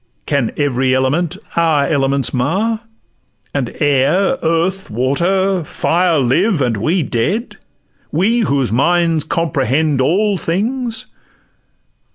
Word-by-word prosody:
Can 140 -6 0
every 130 -3 +1
element 150 +7 0 0.2
our 160 -4 +2
elements 135 -3 0
mar? 190 - 0 0.7
And 135 -5 -3
air—earth—water—fire 170 - +1
live—and 135 - +1
we 160 - 0
dead? 180 - -2 0.5
We 205 +10 +2
whose 140 - 0
minds 165 +4 +2
comprehend 145 -2 0
all 195 +7 +1
things? 225 +8 -2
160 Hz, 85 wpm, -16 LUFS, 135-190 Hz, 0.7 s, our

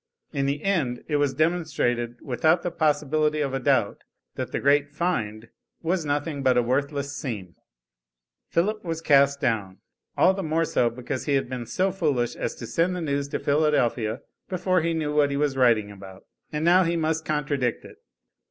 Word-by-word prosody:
In 140 -1 0
the 140 +2 -2
end 155 -12 0
it 150 - +1
was 145 -2 +1
demonstrated 140 -8 0
without 155 +6 +2
the 175 - -2
possibility 150 -1 +1
of 140 -3 -1
a 135 - 0
doubt 130 -6 +1 0.3
that - - -5
the - - -1
great 145 +1 +3
"find" 115 -9 -2 0.3
was 170 +1 0
nothing 145 0 -2
but 130 -2 +3
a 125 - +4
worthless 140 +3 -1
seam. 100 - -5 1.0
Philip 210 +6 0
was 165 -2 -3
cast 140 -3 +4
down, 100 -7 -1 0.4
all 185 - +5
the 195 - -4
more 165 -1 0
so 120 -5 +2
because 125 +2 -5
he 145 - +1
had 135 - 0
been 125 -2 -5
so 190 - 0
foolish 145 -10 0
as - - -3
to - - -8
send 170 +9 0
the 180 - -4
news 140 -2 -1
to - - -3
Philadelphia 130 -6 +1 0.3
before 185 -1 +1
he 165 +1 0
knew 150 -2 -1
what 150 -1 +3
he 140 - -2
was 145 -2 0
writing 115 -5 +3
about. 95 -1 -12 0.3
And 150 +1 -2
now 180 +2 +6
he 170 0 0
must 160 0 0
contradict 145 -5 -1
it. - - -13
145 Hz, 185 wpm, -25 LUFS, 125-160 Hz, 1.0 s, now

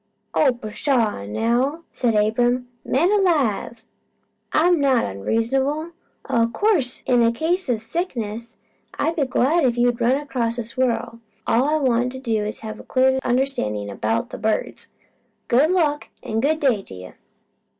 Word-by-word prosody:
"Oh 275 -4 +3
pshaw 220 - -1
now!" 245 - 0
said 235 -3 0
Abram. 240 +4 +1
"Man 330 +9 +2
alive! 280 - +1 0.7
I'm 345 +1 +3
not 270 -4 +3
onreasonable. 265 - -1 0.4
O' 230 -1 +2
course 345 - +1
in 240 -2 +3
case 330 +5 0
o' 240 - +2
sickness 230 - -4 0.4
I'd 330 - 0
be 285 -5 0
glad 295 +6 +2
if 245 -2 +2
you 240 0 +4
could 240 0 -11
run 245 +3 +3
across 245 -5 -2
a 240 - -2
squirrel. 235 0 -2 0.3
All 245 +4 +2
I 300 +2 +1
wanted 255 -1 0 0.2
was 210 - -3
to - - -10
have 215 - -6
a - - -10
clear 265 0 +2
understandin' 245 - -1
about 110 +3 -2
the - - -7
birds. 220 0 -2 0.6
Good 270 +6 +4
luck, 310 -5 +1
an' 220 - -2
good 305 +6 +1
day 255 -9 +2
to 95 - -12
you!" 90 0 -10
245 Hz, 150 wpm, -22 LUFS, 225-285 Hz, 0.7 s, you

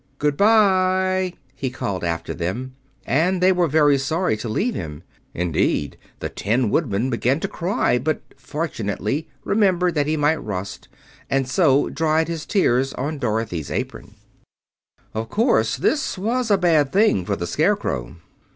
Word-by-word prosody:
"Good 150 0 +1
bye!" 185 -2 +3 0.2
he 130 - -3
called 100 -7 -4
after 85 -1 -2
them, 110 +10 -4 0.3
and 175 +8 +1
they 185 +1 +5
were 180 -2 +2
very 145 -2 +4
sorry 160 0 0
to 110 +2 -5
leave 225 - 0
him. 75 - -6 0.3
Indeed, 85 -4 0 0.3
the - - -2
Tin 115 +2 0
Woodman 125 -4 0
began 125 +4 +1
to - - -1
cry, 175 -8 0
but 155 +5 -1 0.2
fortunately 135 - -3 0.2
remembered 185 -4 +2
that 145 -2 0
he 155 +1 0
might 150 +2 +1
rust, 100 -2 -5 0.4
and 135 -1 +1
so 140 -1 +3
dried 160 0 +1
his 165 -2 -4
tears 135 - +2
on 145 +3 -3
Dorothy's 110 - -2
apron. - - -5 1.0
Of 110 +1 -4
course 225 - +2
this 285 -8 0
was 235 +5 -1
a 200 - +5
bad 160 -6 +3
thing 195 - +3
for 100 +2 -1
the 85 - -4
Scarecrow. 60 -7 -1
145 Hz, 150 wpm, -22 LUFS, 110-180 Hz, 1.0 s, they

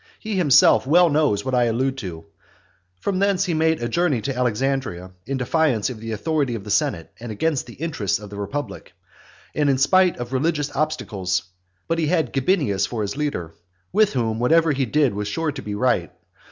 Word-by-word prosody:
He 215 -1 -4
himself 150 -6 +5
well 170 +2 +5
knows 145 -9 +1
what 130 - -2
I 125 -1 +3
allude 130 +4 0
to. 85 -6 -7 0.8
From 195 -2 -1
thence 195 -1 +2
he 175 - -1
made 160 -3 +1
a - - 0
journey 170 -4 +1
to 135 +2 -3
Alexandria, 125 -6 -1 0.2
in 135 0 -2
defiance 130 -3 +1
of 115 - -8
the 115 +1 -6
authority 140 +2 -1
of 105 - -6
the 105 - -6
senate, 85 -4 0
and 120 -1 -7
against 145 +6 -1
the 120 - -11
interests 145 - -1
of 105 0 -11
the - - -7
republic, 105 +9 -5 0.6
and 150 -1 +1
in 135 - +3
spite 185 +6 +4
of 120 +1 -6
religious 150 +1 -1
obstacles; 100 -11 -1 0.4
but 165 0 0
he 160 - +1
had 160 -6 0
Gabinius 135 - +1
for 115 -3 -3
his 100 +3 -3
leader, 135 - -3 0.4
with 215 +1 +3
whom 115 -3 -1
whatever 160 +6 +3
he 135 -2 0
did 145 -1 +2
was 105 0 -3
sure 155 +9 -1
to 140 -1 -7
be 105 -3 -5
right. 105 -8 +1
135 Hz, 195 wpm, -22 LUFS, 110-160 Hz, 0.8 s, himself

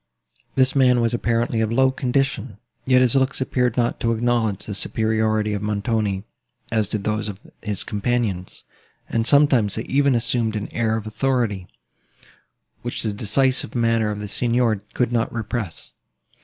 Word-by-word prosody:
This 130 0 +3
man 125 -2 +4
was 115 0 +1
apparently 115 -1 0
of 110 0 0
low 130 +2 +3
condition; 130 -4 -1 0.3
yet 130 -1 +5
his 125 - +2
looks 135 0 +1
appeared 125 -1 0
not 120 -1 0
to 115 0 +1
acknowledge 115 -3 0
the 105 - -5
superiority 110 0 0
of 100 - -3
Montoni, 105 -1 -1 0.5
as 110 -3 +1
did 105 -2 -3
those 105 0 -1
of 100 -2 -8 0.2
his 105 -2 -3
companions; 105 -4 -2 0.4
and 115 0 0
sometimes 135 -8 +4
they - - -3
even 140 -1 +2
assumed 115 -1 +1
an 105 -1 -5
air 110 -1 0
of 110 - -6
authority, 110 -5 -1 1.1
which 120 +1 -3
the 110 -2 -1
decisive 130 +7 +1
manner 115 -2 +2
of 105 -1 -4
the 105 - -5
Signor 115 -1 +1
could 125 -2 +1
not 115 -1 0
repress. 110 -5 -5
115 Hz, 155 wpm, -22 LUFS, 105-125 Hz, 1.1 s, yet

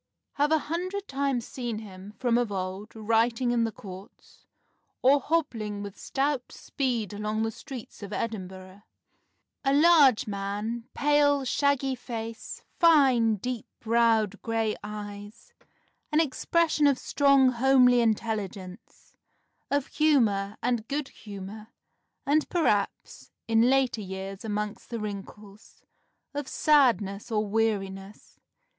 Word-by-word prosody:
Have 290 +1 +1
a 315 - +5
hundred 365 +6 -4
times 270 -3 -1
seen 240 -4 -4
him, 205 -1 -10
from 240 -2 +2
of 240 -4 -1
old, 190 +3 -5
writing 230 +3 +1
in 235 -1 +2
the 225 - -2
Courts, 195 +1 -13 0.6
or 275 +3 +6
hobbling 225 -10 -2
with 200 -1 -8
stout 275 -2 -2
speed 240 -7 -3
along 210 +1 -2
the 225 - -1
streets 255 -1 -10
of 200 0 -8
Edinburgh; 190 -3 -5 0.8
a 275 - +2
large 295 -6 +6
man, 210 +3 -4
pale, 290 -1 +3
shaggy 275 0 +1
face, 230 -2 -7 0.2
fine, 265 -9 +5
deep 245 +2 -5
browed 225 -3 +2
gray 225 -1 -1
eyes, 205 0 -9 0.6
an 300 - +3
expression 320 0 +2
of 280 -2 +3
strong 275 -2 +4
homely 250 0 +5
intelligence, 210 -3 -3 0.6
of 285 -1 +1
humour 215 -10 +1
and 240 -2 0
good 285 0 -3
humour, 205 +1 -9 0.6
and, 295 +2 +2
perhaps 260 - -1 0.2
(in 230 +2 +4
later 260 -4 +2
years 190 0 -7
amongst 210 -1 -4
the 235 - -4
wrinkles), 205 0 -9 0.5
of 290 -1 -4
sadness 240 -10 +2
or 215 -1 +1
weariness.... 200 -2 -3
230 Hz, 120 wpm, -27 LUFS, 205-270 Hz, 0.8 s, or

